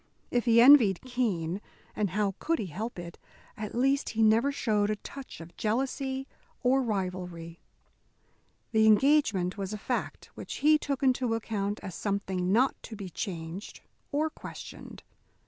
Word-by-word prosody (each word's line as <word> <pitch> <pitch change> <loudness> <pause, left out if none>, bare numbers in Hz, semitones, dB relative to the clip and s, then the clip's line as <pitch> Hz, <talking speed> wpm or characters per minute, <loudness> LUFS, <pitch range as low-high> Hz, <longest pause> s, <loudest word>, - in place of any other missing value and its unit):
If 245 0 +1
he 235 -1 +5
envied 235 -7 +7
Keene 205 -8 -1 0.3
and 210 -2 0
how 200 +1 0
could 330 0 0
he 210 - -3
help 210 +8 -5
it 170 -1 -8 0.4
at 215 0 -6
least 270 +3 +2
he 225 0 +1
never 225 +6 +4
showed 210 -6 +1
a 215 - +1
touch 270 +5 -10
of 165 +1 -11
jealousy 265 +4 -1 0.4
or 260 +2 +4
rivalry. 180 -6 -4 1.1
The 220 -1 +4
engagement 215 -6 +3
was 195 +1 -3
a - - -3
fact 245 +4 -4
which - - -7
he 305 0 +6
took 280 -2 -3
into 250 -3 +2
account 210 -2 -2
as 185 - -6
something 190 -2 -2
not 250 +6 +3
to 225 - -8
be 195 -4 -7
changed 170 +2 -6 0.3
or 310 +2 0
questioned. - - -10
215 Hz, 150 wpm, -29 LUFS, 190-255 Hz, 1.1 s, envied